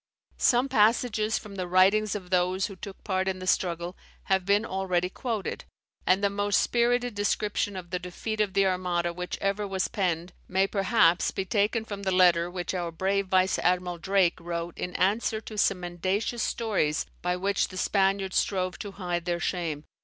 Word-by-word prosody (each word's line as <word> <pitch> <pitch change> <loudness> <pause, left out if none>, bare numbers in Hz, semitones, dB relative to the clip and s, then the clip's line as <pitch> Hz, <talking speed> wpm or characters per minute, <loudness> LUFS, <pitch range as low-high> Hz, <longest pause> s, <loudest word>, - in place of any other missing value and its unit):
Some 245 +2 +3
passages 220 -2 +2
from 200 -2 -9
the 185 -1 -3
writings 195 +4 +4
of 185 -3 -7
those 185 +1 +2
who 195 - -7
took 190 +1 -10
part 190 -2 -1
in 190 -1 -1
the 185 - -7
struggle, 175 -1 0 0.3
have 190 -1 0
been 205 +2 +3
already 185 -2 -1
quoted; 225 -5 -4 0.4
and 185 +2 +3
the 200 - +4
most 205 0 +1
spirited 245 0 +1
description 205 0 -1
of 175 -2 -8
the 180 - -1
defeat 215 +5 -4
of 200 -3 -1
the 195 - +4
Armada 180 -2 0
which 180 +1 -5
ever 200 +1 0
was 190 -1 -1
penned, 175 -3 -2
may 190 +1 +2
perhaps 195 -3 +3
be 195 - -3
taken 215 +3 +1
from 205 -2 -6
the 190 -1 -1
letter 175 -2 +4
which 180 0 -4
our 175 -2 -2
brave 195 +3 0
vice 185 0 +2
admiral 180 -1 0
Drake 190 -1 +2
wrote 170 0 -4
in 180 - -5
answer 215 +4 +1
to 220 - -9
some 195 -2 +2
mendacious 185 +7 -2
stories 200 -12 0 0.2
by 180 0 0
which 195 +2 0
the 185 - -9
Spaniards 195 0 +1
strove 185 -2 0
to 200 -1 -6
hide 175 -3 -3
their 175 -1 -1
shame. 165 -5 -2
190 Hz, 185 wpm, -27 LUFS, 180-205 Hz, 0.4 s, writings